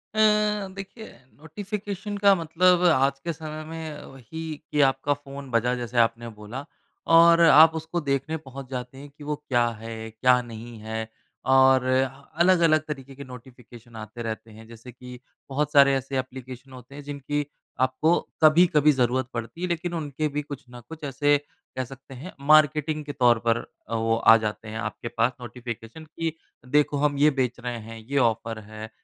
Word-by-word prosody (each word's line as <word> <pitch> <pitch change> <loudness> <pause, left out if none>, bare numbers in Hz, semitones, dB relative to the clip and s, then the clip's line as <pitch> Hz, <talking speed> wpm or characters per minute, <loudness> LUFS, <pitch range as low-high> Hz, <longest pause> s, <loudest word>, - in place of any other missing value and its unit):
अ, 210 -1 +3
देखिए 195 +3 -9 0.2
नोटिफ़िकेशन 200 +5 -6
का 200 -1 +5
मतलब 175 +1 +3
आज 135 -4 +3
के 170 +3 -4
समय 155 0 -7
में 160 -2 -7
वही 135 +4 -10 0.3
कि 150 - +2
आपका 135 +2 0
फ़ोन 140 -1 -10
बजा 120 +2 +2
जैसे 120 -1 -5
आपने 115 0 +2
बोला 120 +7 -7 0.5
और 170 0 +7
आप 160 -1 +8
उसको 160 +2 -3
देखने 140 +3 -1
पहुँच 135 -3 -10
जाते 125 0 -6
हैं 145 +1 -10
कि 145 +1 -15
वो 150 +1 -2
क्या 125 -5 0
है? 115 0 -7
क्या 125 +3 +3
नहीं 115 0 -10
है? 110 +1 -5 0.4
और 130 -1 +5
अलग-अलग 155 +6 +2
तरीके 135 -3 -7
के 140 - -9
नोटिफ़िकेशन 120 -2 -14
आते 110 +2 -8
रहते 110 0 -6
हैं। 110 +1 -14
जैसे 115 +2 -12
कि 125 0 -11 0.3
बहुत 145 +2 -1
सारे 140 -1 +7
ऐसे 135 +1 -4
एप्लीकेशन 130 0 -8
होते 125 +2 -13
हैं 145 - -9
जिनकी 145 +1 -3 0.4
आपको 130 +6 +2 0.2
कभी-कभी 155 -1 +6
ज़रूरत 130 -1 0
पड़ती 115 +8 -6
है। 180 - -1
लेकिन 175 0 -3
उनके 155 -2 -2
भी 150 0 -3
कुछ 145 -1 -9
न 120 0 -11
कुछ 160 -1 -10
ऐसे 145 +1 +2 0.4
कह 130 - 0
सकते 135 +2 -13
हैं 145 +9 -9
मार्केटिंग 155 0 +4
के 145 - -5
तौर 120 -3 +4
पर 115 - +4 0.3
अ, 115 - -2
वो 115 0 +1
आ 115 0 +7
जाते 110 0 -4
हैं। 110 +1 -6
आपके 105 +2 -5
पास 115 +1 +1
नोटिफ़िकेशन 120 +4 -8
कि 160 +1 -4 0.3
देखो 145 +2 +2
हम 145 -1 +1
ये 150 +2 +5
बेच 125 -1 -1
रहे 120 -1 -4
हैं, 115 +1 -10
ये 130 +6 -4
ऑफर 115 -3 0
है 110 0 -8
135 Hz, 175 wpm, -25 LUFS, 120-155 Hz, 0.5 s, आप